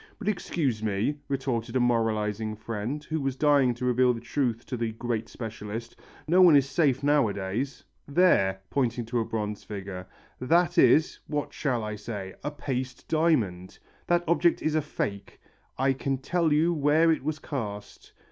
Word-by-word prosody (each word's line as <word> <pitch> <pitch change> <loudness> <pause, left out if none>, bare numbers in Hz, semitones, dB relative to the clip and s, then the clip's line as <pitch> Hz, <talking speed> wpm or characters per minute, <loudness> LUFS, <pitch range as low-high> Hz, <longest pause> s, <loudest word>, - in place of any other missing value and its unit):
"But 210 - -8
excuse 155 - -1
me," 110 +7 -1
retorted 130 -4 -2
a - - +3
moralizing 110 -3 0
friend 115 +6 -4
who 160 0 -3
was 135 -1 -1
dying 140 -4 +3
to 125 - -4
reveal 125 0 +3
the - - -6
truth 120 -1 -2
to 130 - -4
the 115 -2 -2
"great 115 -1 -3
specialist," 115 0 -7 0.3
"no 180 +4 +5
one 175 -4 +8
is 140 -1 +4
safe 135 -1 +1
nowadays. 125 -3 0 0.2
There," 120 - +3
pointing 125 -3 0
to 120 +1 -1
a 115 - 0
bronze 105 -2 -4
figure, 95 -3 -7 0.3
"that 170 +6 +2
is, 140 +5 +4
what 145 -1 -3
shall 125 -6 -1
I 105 0 -4
say? 100 -3 -6
a - - -1
paste 130 -3 -5
diamond! 120 - +1 0.3
That 175 0 +2
object 170 +1 +2
is 155 - +1
a 155 - +2
fake. 100 -8 -5 0.4
I 135 +1 +2
can 135 +1 -2
tell 165 +4 0
you 160 +4 +3
where 155 +2 +3
it 155 - -1
was 155 +1 -2
cast. 105 -10 -6
125 Hz, 165 wpm, -27 LUFS, 110-150 Hz, 0.4 s, one